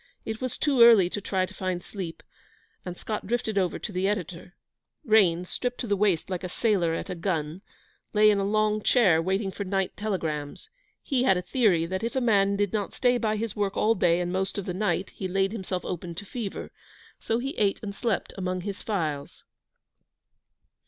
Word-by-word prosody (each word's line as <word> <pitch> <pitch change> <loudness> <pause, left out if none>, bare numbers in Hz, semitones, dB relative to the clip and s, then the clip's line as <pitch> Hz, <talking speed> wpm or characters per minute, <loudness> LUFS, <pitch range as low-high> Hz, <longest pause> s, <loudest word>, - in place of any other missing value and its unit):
It 220 +2 -4
was 255 -2 -2
too 275 -5 +2
early 220 -7 +8
to 205 - -3
try 190 -1 0
to - - -13
find 185 -2 -3
sleep, 180 -5 -7 0.6
and 180 -1 -6
Scott 215 -3 -4
drifted 220 -2 0
over 185 -2 0
to 215 - -6
the 185 0 0
editor. 180 -3 -4 0.5
Raines, 180 -6 +4
stripped 245 +5 -3
to - - -3
the 205 -3 +1
waist 195 -5 +1
like 185 -1 -4
a 180 - -3
sailor 180 -5 +1
at - - -5
a - - -1
gun, 165 -1 -2 0.5
lay 215 0 +6
in 205 - +1
a - - 0
long 215 +1 +1
chair, 195 -9 +4
waiting 190 +3 -1
for 200 - -5
night 195 -1 -1
telegrams. 165 - -4 0.3
He 265 -3 0
had 195 -7 +4
a 180 - -3
theory 190 -7 +2
that 190 +2 -3
if 235 +4 -2
a - - +3
man 200 -5 +3
did 205 -1 0
not 205 -2 -2
stay 245 -1 +2
by 215 -2 0
his 220 0 -3
work 200 -1 -1
all 220 - +4
day 175 -4 +2
and 175 0 -2
most 190 +1 -1
of 200 - -3
the 180 - -3
night 190 -1 -1
he 190 - -5
laid 195 +1 +1
himself 190 -4 -4
open 175 -1 -5
to 205 +4 -6
fever; 215 -1 -5 0.5
so 225 - -1
he 270 +3 -3
ate 200 -2 +2
and 200 -1 -4
slept 220 +1 -2
among 185 -1 -2
his 200 +1 -5
files. 155 -9 -3
195 Hz, 205 wpm, -27 LUFS, 180-215 Hz, 0.6 s, early